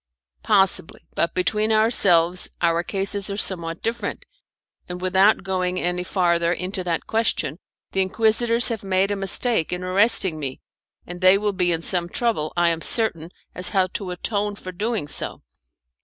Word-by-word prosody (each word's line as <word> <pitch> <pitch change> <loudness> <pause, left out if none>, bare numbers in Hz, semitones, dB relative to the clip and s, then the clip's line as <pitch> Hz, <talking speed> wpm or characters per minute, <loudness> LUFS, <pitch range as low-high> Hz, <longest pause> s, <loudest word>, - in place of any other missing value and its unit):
"Possibly, 195 -6 +2
but 170 - -1
between 215 +4 0
ourselves 185 -6 +3
our 170 -1 +1
cases 195 +2 -2
are 200 - -4
somewhat 170 -5 +1
different; 235 - -4 0.6
and 180 0 -5
without 190 +3 +3
going 185 -1 -1
any 180 0 -2
farther 170 -2 +1
into 185 +1 -3
that 170 -2 -2
question, 185 -9 -1 0.3
the 195 - 0
Inquisitors 225 +4 +2
have 225 -3 -4
made 190 +1 0
a - - 0
mistake 195 -1 +1
in 180 0 -4
arresting 185 -3 +2
me, 135 -3 -5 0.5
and 175 +1 -9
they 185 +1 +6
will 205 0 -1
be 180 -2 0
in 165 0 -2
some 175 -1 +1
trouble, 215 -9 -1
I 175 0 +3
am 165 -1 -2
certain, 170 -8 -1 0.2
as 180 - 0
to - - -4
how 190 -2 +2
to 195 -4 -4
atone 205 +3 -3
for 185 -2 -9
doing 210 -2 -3
so." - - -1
185 Hz, 165 wpm, -22 LUFS, 175-210 Hz, 0.6 s, they